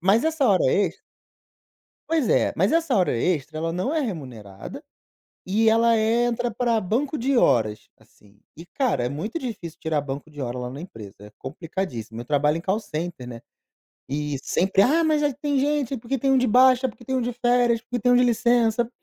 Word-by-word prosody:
mas 195 +6 +3
essa 320 -4 +1
hora 190 -3 +3
extra. 190 -3 0 1.1
Pois 320 -6 +1
é, - - +2
mas - - +2
essa 325 -6 +1
hora 185 -3 +2
extra, 155 0 -1
ela 165 +1 -2
não 185 +10 -2
é 320 - +1
remunerada 125 - -7 0.6
e 220 +4 +3
ela 230 0 +4
entra 235 +2 +1
pra 230 0 0
banco 245 +10 -1
de 265 +1 +1
horas, 110 - +1
assim. 100 0 -24 0.2
E, 165 - -12
cara, 235 - -1
é - - -1
muito 170 - -4
difícil 210 - -7
tirar 155 -3 -1
banco 145 +2 -7
de 145 -2 -7
hora 125 0 -4
lá 125 0 -4
na 135 +3 -8
empresa, 110 - -11
é 105 0 -12
complicadíssimo. 130 - -6
Eu - - -7
trabalho 150 +2 +1
em - - -5
call 190 +4 0
center, 160 - -6
né, 115 -2 -8 0.7
e 145 0 -3
sempre: 190 +6 +1
"Ah, 310 +10 +3
mas 310 -2 +2
é 290 -2 +1
que 280 - -25
tem 285 -2 0
gente, 280 -2 0
porque 240 +4 -3
tem 270 +2 +1
um 265 - +4
de 255 0 +2
baixa, 255 +2 +5
porque 240 0 -11
tem 260 +2 -2
um 255 - 0
de 240 0 -2
férias, 240 -1 +2
porque 245 +1 -4
tem 245 +3 +2
um - - +5
de 250 - +5
licença", 235 -1 +2
215 Hz, 205 wpm, -24 LUFS, 150-245 Hz, 1.1 s, baixa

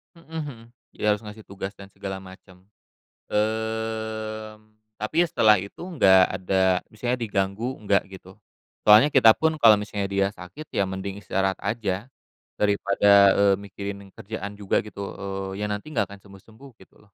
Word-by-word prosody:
Mhm 165 - -18
mhm. 150 -6 -5 0.4
Dia 105 - +1
harus 105 - 0
ngasih 105 +1 -10
tugas 100 0 -7
dan 100 0 -13
segala 95 0 -6
macem. 95 -1 -15 0.7
Mmm, 110 0 -3 0.3
tapi 110 +10 0
ya - - -1
setelah 110 -7 +5
itu 100 +2 -10
nggak 115 - +5
ada 95 0 +1
misalnya 120 +3 -2
diganggu, 105 +3 -2
enggak 100 -2 +2
gitu. 95 -1 -13 0.5
Soalnya 105 +7 +8
kita 120 -5 +7
pun 160 0 +1
kalau 110 -2 +8
misalnya 105 -1 -3
dia 100 0 +1
sakit, 105 +11 -11
ya 100 - +1
mending 95 +1 -5
istirahat 95 -1 -1
aja. 105 0 -3 0.5
Daripada, 100 -1 +5
eee, 100 -1 +5
mikirin 100 0 -7
kerjaan 100 0 -7
juga 100 0 0
gitu, 105 -1 -11 0.2
eee, 95 +1 -5
ya - - 0
nanti 105 +9 -6
nggak 100 -3 0
akan 100 - -11
sembuh-sembuh 110 +6 -16
gitu - - -21
loh. 105 - -23
105 Hz, 160 wpm, -24 LUFS, 95-110 Hz, 0.7 s, Soalnya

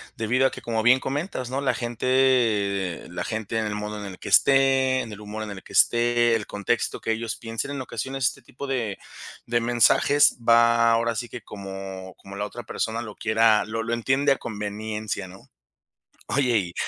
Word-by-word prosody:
debido 125 +4 +2
a - - -4
que, 130 - -9
como 115 -2 -1
bien 130 +2 +6
comentas, 135 -3 -3
¿no?, 135 +2 -2
la 140 - +1
gente 115 -7 +1
la 90 - -4
gente 110 0 -3
en 110 - -1
el 105 0 -3
modo 105 0 -5
en 100 - -7
el 90 - -11
que - - -7
esté, 135 -1 +4
en 110 - -7
el 105 - -9
humor 105 +1 -6
en 105 - -6
el 95 - -9
que - - -14
esté, 120 0 +3
el 105 - -3
contexto 105 +3 -2
que 110 - -1
ellos 115 0 -2
piensen 115 +4 -5
en 140 -2 -4
ocasiones, 130 +2 -4
este 140 - -4
tipo 130 +3 -9
de 115 -7 -2 0.5
de 120 0 +1
mensajes 120 +5 +4
va 115 0 +5
ahora 115 0 +1
sí 120 +2 -4
que 125 - -8
como 95 -2 -8
como 100 0 -12
la 105 - -2
otra 120 +3 -8
persona 110 +2 -3
lo 110 -3 -8
quiera, 110 -1 +3
lo 115 +1 -3
lo 115 +1 -2
entiende 130 +4 +2
a 135 - +3
conveniencia, 105 -1 -5
¿no? 95 +2 -15 0.8
Oye, 125 -5 +2
y 85 -3 -4
115 Hz, 200 wpm, -24 LUFS, 105-125 Hz, 0.8 s, bien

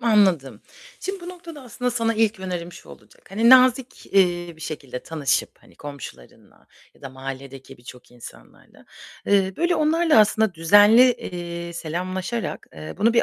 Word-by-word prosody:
Anladım. 195 - +2 0.4
Şimdi 385 0 -5
bu 345 - -9
noktada 340 -5 -11
aslında 250 0 -4
sana 230 -1 -1
ilk 220 -2 0
önerim 175 -2 -5
şu - - -14
olacak: - - -17
Hani, 225 +5 +3
nazik, 255 0 +4
eee, 175 -3 +1
bir - - -19
şekilde 140 -5 -7
tanışıp, 155 -5 -1
hani, - - -22
komşularınla 140 - -12 0.3
ya - - -26
da 135 - -7
mahalledeki 135 0 -9
birçok 120 +1 -14
insanlarla, 120 -1 -16 0.4
eee, 195 -1 +2
böyle 345 +1 +1
onlarla 315 -1 +2
aslında 215 -2 +2
düzenli, 205 +9 +6
eee, 170 -4 -7
selamlaşarak, 185 +7 -5
eee, 80 0 -9
bunu 230 +2 +3
bir 235 - +3
190 Hz, 150 wpm, -22 LUFS, 155-235 Hz, 0.4 s, düzenli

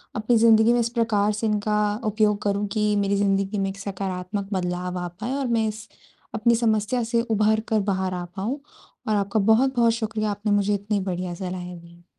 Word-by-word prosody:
अपनी 225 +2 +2
ज़िंदगी 225 0 +5
में 240 - +2
इस 235 0 +1
प्रकार 225 -3 +1
से 215 +2 -2
इनका 210 0 0 0.3
उपयोग 210 -1 +1
करूँ 205 0 0
कि 210 -1 +1
मेरी 200 0 +1
ज़िंदगी 195 0 +1
में 195 0 0
एक 195 - -7
सकारात्मक 195 0 -4
बदलाव 180 0 -2
आ 175 - -3
पाए 210 +9 -5
और 275 -2 -1
मैं 225 -2 +1
इस 215 0 -6 0.5
अपनी 235 +1 +3
समस्या 225 +1 +1
से 230 +1 +1
उभर 220 -2 +2
कर 220 -2 +2
बाहर 190 -1 -1
आ 180 -1 -3
पाऊँ। 220 +9 -3 0.5
और 215 - +2
आपका 200 +1 0
बहुत-बहुत 235 +3 +3
शुक्रिया 220 -2 -2
आपने 205 +1 -2
मुझे 205 0 +2
इतने 205 +1 -1
बढ़िया 180 -1 -3
सलाहें 180 -1 -6
दीं। 170 0 -18
210 Hz, 190 wpm, -24 LUFS, 195-225 Hz, 0.5 s, ज़िंदगी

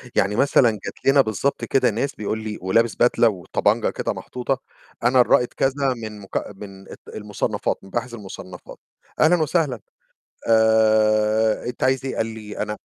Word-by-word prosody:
يعني 100 +2 +2
مثلًا 130 -1 +4
جات 105 - -9
لنا 135 +1 +6
بالضبط 130 +4 -2
كده 130 -2 +2
ناس 120 +6 -2
بيقول 110 +1 -3
لي 110 -1 -5
ولابس 115 +5 +1
بدلة 120 -1 +3
وطبنجة 90 -5 0
كده - - -3
محطوطة، 125 +1 -4 0.4
"أنا 125 +1 +5
الرائد 125 0 +3
كذا 135 0 0
من 110 -2 -8
مك 100 - -5 0.2
من 95 -1 -11
ال - - -8 0.2
المُصنفات 105 -1 -2
مباحث 120 +5 -4
المُصنفات" 95 -4 -10 0.4
"أهلًا 160 +3 +5
وسهلًا. 150 -5 0 0.7
آآ 110 -1 +3
أنت 120 0 -4
عايز 130 0 +1
إيه؟" 135 - -3
قالي 110 -2 -5
أنا 105 0 -3
110 Hz, 150 wpm, -22 LUFS, 105-130 Hz, 0.7 s, لنا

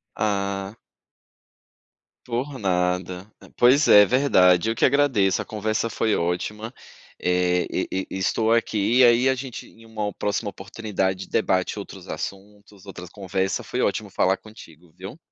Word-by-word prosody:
Ah. 100 -1 -2 1.5
Por 130 +4 -3
nada. 90 0 -1
Ah, - - -16
pois 130 +5 +4
é, 105 0 +8
verdade. 95 -8 +3
Eu 115 - -3
que - - +1
agradeço, 130 -9 +2
a - - -11
conversa 110 +1 -2
foi 110 +1 0
ótima, 105 +7 -3 0.5
eh, 90 -1 +1
e - - -3
e 95 0 -2
estou 110 +4 0
aqui, 115 0 +1
e 130 - +7
aí, 120 +2 +5
a 130 - +3
gente, 130 -1 -7
em 115 - -19
uma 105 -2 -4
próxima 105 +1 -2
oportunidade, 95 -1 -4
debate 95 +2 0
outros 95 -2 -11
assuntos, 100 +4 -8
outras 90 -2 -10
conversas. 95 -1 -3
Foi - - -3
ótimo - - -1
falar 95 +1 +1
contigo, 90 -7 -16
viu? 95 - -9
100 Hz, 145 wpm, -23 LUFS, 95-115 Hz, 1.5 s, é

